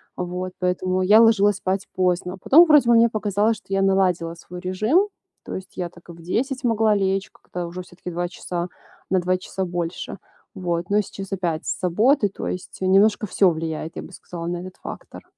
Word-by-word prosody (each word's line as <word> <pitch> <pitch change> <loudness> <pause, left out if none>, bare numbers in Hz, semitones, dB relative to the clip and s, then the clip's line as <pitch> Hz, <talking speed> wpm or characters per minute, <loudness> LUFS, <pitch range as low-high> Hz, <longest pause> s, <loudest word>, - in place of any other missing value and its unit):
А, - - -3
вот 180 +1 -4
поэтому, 185 0 0
я 210 +4 +6
ложилась 205 -3 +4
спать 190 0 -2
поздно, 180 0 0
потом 330 +5 +7
вроде 295 -7 +5
бы 235 - +6
мне 230 0 +6
показалось, 215 0 0
что - - -21
я 195 - +2
наладила 185 -4 +2
свой 180 +1 -10
режим, 215 - +2 0.4
то - - -5
есть 190 - -9
я 175 -1 -2
так 170 0 -19
и - - -6
в 165 - -14
10:00 255 - -2
могла 220 -3 +3
лечь, 195 0 0
как-то 175 -1 -7
уже 175 +2 -6
всё-таки 180 0 -9
2 175 +1 -2
часа 175 -1 -4 0.4
на 185 - +3
2 185 +1 +1
часа 190 +1 -4
больше. 175 +1 -4 0.4
Вот, 175 -1 -2
но 210 +1 +4
сейчас 195 -1 -8
опять 175 -5 -2
с - - -2
заботы, 210 - +3
то 195 - -6
есть, 180 - -6
э, - - 0
немножко 205 +3 +4
всё 190 0 +4
влияет, 160 0 -4
я - - -5
бы - - -12
сказала, 170 -2 -8
на 175 0 -2
этот 185 +1 -8
фактор. - - -9
185 Hz, 205 wpm, -23 LUFS, 175-205 Hz, 0.4 s, потом